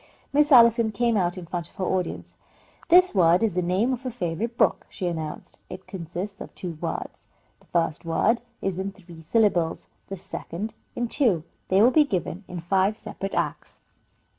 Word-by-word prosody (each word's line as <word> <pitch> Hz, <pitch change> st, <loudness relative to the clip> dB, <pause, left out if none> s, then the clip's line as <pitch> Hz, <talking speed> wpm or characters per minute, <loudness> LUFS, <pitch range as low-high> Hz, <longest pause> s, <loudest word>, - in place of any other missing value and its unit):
Miss 295 Hz, +1 st, +4 dB
Allison 235 Hz, -3 st, +6 dB
came 235 Hz, +2 st, +1 dB
out 175 Hz, -2 st, +1 dB
in 180 Hz, -, -7 dB
front 170 Hz, -1 st, -5 dB
of -, -, -27 dB
her 185 Hz, -, -2 dB
audience. 180 Hz, -1 st, -2 dB, 0.6 s
"This 365 Hz, +2 st, +6 dB
word 175 Hz, 0 st, +4 dB
is 220 Hz, -5 st, +1 dB
the 180 Hz, -, 0 dB
name 190 Hz, +9 st, +1 dB
of 255 Hz, 0 st, -5 dB
a 255 Hz, -, -2 dB
favourite 225 Hz, +1 st, -3 dB
book," -, -, +2 dB
she 185 Hz, -, -5 dB
announced. 160 Hz, -3 st, -5 dB
"It -, -, -9 dB
consists 190 Hz, +2 st, -6 dB
of -, -, -9 dB
two 170 Hz, -4 st, -6 dB
words. -, -, -5 dB, 0.3 s
The -, -, -26 dB
first 165 Hz, -3 st, 0 dB
word 205 Hz, +8 st, +1 dB, 0.2 s
is 190 Hz, -2 st, -1 dB
in 195 Hz, +1 st, -3 dB
three 175 Hz, -4 st, -14 dB
syllables, 175 Hz, -2 st, +1 dB, 0.2 s
the 195 Hz, -, -6 dB
second 185 Hz, +3 st, -6 dB, 0.2 s
in 240 Hz, -, -1 dB
two. 225 Hz, -, +2 dB, 0.2 s
They 190 Hz, +3 st, +4 dB
will 245 Hz, -, +6 dB
be 305 Hz, +3 st, +6 dB
given 190 Hz, -, -3 dB
in 180 Hz, -2 st, -6 dB
five 195 Hz, +4 st, +1 dB
separate 195 Hz, -3 st, -6 dB
acts." -, -, -3 dB
195 Hz, 185 wpm, -25 LUFS, 175-230 Hz, 0.6 s, Allison